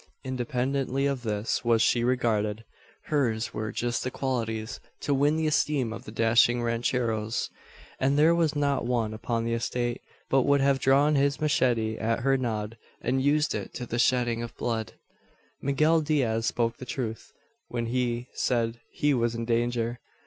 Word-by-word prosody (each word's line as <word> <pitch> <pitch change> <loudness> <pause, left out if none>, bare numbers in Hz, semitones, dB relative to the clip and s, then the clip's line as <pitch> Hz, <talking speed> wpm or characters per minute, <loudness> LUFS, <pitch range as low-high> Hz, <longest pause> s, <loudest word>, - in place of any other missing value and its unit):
Independently 130 +1 -1
of 140 -3 0
this 110 0 -2
was 115 -1 +3
she 120 +1 +3
regarded. 115 -3 0 0.4
Hers 120 -7 0
were 110 -1 -3
just 120 -1 -1
the 130 - -1
qualities 115 -4 -3 0.2
to 145 - 0
win 145 +3 +3
the 160 0 0
esteem 150 -6 +1
of - - -9
the - - -8
dashing 115 +2 +3
rancheros; 115 -2 -1 0.5
and 135 +2 +2
there 155 +3 +5
was 165 -3 +1
not 140 -2 +1
one 115 -3 0
upon 115 +1 -2
the 115 - -1
estate, 120 +1 -2 0.3
but 135 - +3
would 140 +2 +3
have 135 0 +3
drawn 140 +3 +4
his 140 -1 +2
machete 120 -7 +1
at 115 +1 0
her 135 +2 +3
nod, 115 -3 -3 0.2
and 130 +2 0
used 150 +2 +2
it - - -5
to 125 - -4
the 120 0 -3
shedding 120 -2 +2
of 120 0 -7
blood. 115 -2 -2 0.7
Miguel 155 +4 +3
Diaz 125 -7 +1
spoke 115 -1 0
the 130 - -8
truth, 115 -4 -5 0.4
when 120 -1 -3
he 120 0 -1
said 115 -2 0
he 145 0 +1
was 120 -2 +1
in 115 0 -3
danger. 120 0 0
120 Hz, 165 wpm, -27 LUFS, 115-135 Hz, 0.7 s, there